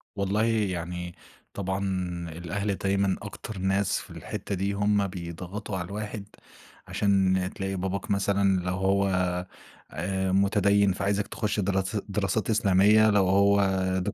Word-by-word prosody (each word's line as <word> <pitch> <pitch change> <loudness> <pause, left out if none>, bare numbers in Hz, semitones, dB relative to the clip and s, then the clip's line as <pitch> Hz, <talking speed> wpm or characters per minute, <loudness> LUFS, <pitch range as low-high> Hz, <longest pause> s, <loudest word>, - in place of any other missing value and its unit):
والله 100 +2 +1
يعني 90 -6 -2 0.4
طبعًا 95 0 -2 0.5
الأهل 95 +5 -3
دايمًا 100 0 +1
أكتر 105 0 -7
ناس 95 +1 +1
في - - -12
الحتّة 100 - -5
دي، 100 +2 -1
هم 100 0 +2
بيضغطوا 90 +3 -6
على 85 - -3
الواحد، 105 +1 -5 0.6
عشان 95 -2 +2
تلاقي 95 -1 -3
باباك 95 +2 -3
مثلًا 100 -1 +2
لو 90 - 0
هو 95 +1 +2 0.8
آآ، 95 +3 -2
مُتديِّن 100 0 +3
فعايزك 100 +1 -1
تخُش 105 -1 -2
دراس 95 +1 0
دراسات 100 +1 -1
إسلامية، 105 0 +5
لو 100 -3 +3
هو 100 +1 +4 0.4
دك 90 - -2
100 Hz, 125 wpm, -27 LUFS, 95-100 Hz, 0.8 s, إسلامية